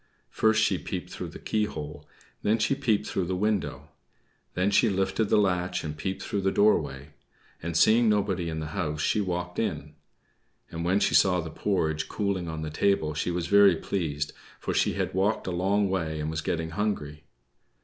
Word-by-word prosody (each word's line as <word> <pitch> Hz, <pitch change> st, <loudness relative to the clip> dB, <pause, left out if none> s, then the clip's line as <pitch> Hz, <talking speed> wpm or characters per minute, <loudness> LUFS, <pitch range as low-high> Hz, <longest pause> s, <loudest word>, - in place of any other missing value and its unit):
First 110 Hz, 0 st, +3 dB
she 95 Hz, -5 st, +1 dB
peeped -, -, -5 dB
through -, -, -5 dB
the -, -, -9 dB
keyhole; 75 Hz, -9 st, -3 dB, 0.3 s
then 110 Hz, +2 st, +2 dB
she 135 Hz, -, +1 dB
peeped 130 Hz, -7 st, +1 dB
through 95 Hz, -, -1 dB
the 95 Hz, +1 st, -2 dB
window. 105 Hz, 0 st, -1 dB, 0.7 s
Then 95 Hz, +3 st, +1 dB
she 110 Hz, +3 st, +4 dB
lifted 95 Hz, +2 st, 0 dB
the 100 Hz, -, +2 dB
latch 90 Hz, -3 st, +1 dB
and 75 Hz, -1 st, -4 dB
peeped 95 Hz, +5 st, -4 dB
through 100 Hz, -, -2 dB
the 95 Hz, 0 st, +1 dB
doorway; 75 Hz, -10 st, +2 dB, 0.5 s
and, 85 Hz, 0 st, -2 dB
seeing 110 Hz, +5 st, +5 dB
nobody 95 Hz, -5 st, 0 dB
in 80 Hz, -, -4 dB
the 75 Hz, -1 st, -5 dB
house, 75 Hz, -6 st, -2 dB
she 105 Hz, +7 st, +1 dB
walked 90 Hz, -2 st, -3 dB
in. 75 Hz, +1 st, -3 dB, 0.8 s
And 85 Hz, 0 st, -4 dB
when 90 Hz, +4 st, +2 dB
she -, -, +2 dB
saw 90 Hz, -2 st, +5 dB
the 80 Hz, -2 st, -5 dB
porridge 80 Hz, -5 st, -1 dB
cooling 100 Hz, -4 st, -1 dB
on 80 Hz, -1 st, -4 dB
the 75 Hz, -, -4 dB
table 80 Hz, -2 st, +1 dB
she 75 Hz, +3 st, -2 dB
was 85 Hz, -1 st, -2 dB
very 100 Hz, 0 st, +6 dB
pleased, 75 Hz, -5 st, -3 dB, 0.3 s
for -, -, -3 dB
she -, -, +2 dB
had -, -, -2 dB
walked 95 Hz, +4 st, +1 dB
a 95 Hz, -, -2 dB
long 100 Hz, +3 st, +1 dB
way, 80 Hz, -5 st, -2 dB
and 75 Hz, +1 st, -2 dB
was 80 Hz, -1 st, -3 dB
getting 80 Hz, 0 st, -2 dB
hungry. 75 Hz, -6 st, -3 dB
90 Hz, 190 wpm, -27 LUFS, 80-100 Hz, 0.8 s, very